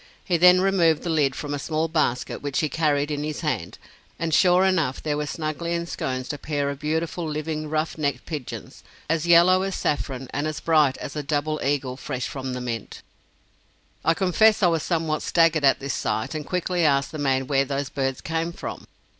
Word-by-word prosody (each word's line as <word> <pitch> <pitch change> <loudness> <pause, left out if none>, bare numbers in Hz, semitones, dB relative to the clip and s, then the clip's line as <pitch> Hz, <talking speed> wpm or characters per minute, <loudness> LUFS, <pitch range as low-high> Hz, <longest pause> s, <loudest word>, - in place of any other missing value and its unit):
He 180 - +1
then 180 +2 +6
removed 175 -5 +3
the 175 - -1
lid 145 -4 +2
from 145 -1 -4
a 145 - -2
small 160 +3 -1
basket 155 -6 -1
which 145 -2 -1
he 155 - 0
carried 150 -2 +1
in 145 0 -2
his 150 -1 -4
hand, - - -2 0.4
and 165 -1 -2
sure 180 +2 +5
enough 165 -9 0
there 150 -1 0
were 150 0 -2
snugly 160 +3 -3
ensconced 135 -6 -3
a 145 - -7
pair 145 -2 -1
of 140 - -8
beautiful 160 +3 -2
living 155 0 -3
ruff 155 +1 -2
necked 140 -4 -1
pigeons, 150 -6 -7 0.2
as 165 +1 0
yellow 175 +2 +6
as 195 0 -2
saffron 135 -3 -2
and 145 +2 -1
as 155 - -4
bright 150 -5 +3
as 140 - -7
a 150 - -2
double 150 +1 -1
eagle 135 -2 -1
fresh 130 -3 -4
from 130 -2 -5
the 125 - -4
mint. 115 -4 -5 1.0
I 165 - +3
confess 205 +4 +3
I - - +7
was 165 -2 +1
somewhat 160 -2 -1
staggered 165 -3 +3
at 135 - +4
this 140 0 -3
sight, 110 +5 -2
and 155 -2 -5
quickly 180 -1 0
asked 140 -3 +2
the 155 - -6
man 135 -2 +1
where 135 0 +2
those 140 0 -3
birds 135 -2 -2
came 165 +1 -2
from. - - -7
155 Hz, 200 wpm, -24 LUFS, 140-165 Hz, 1.0 s, I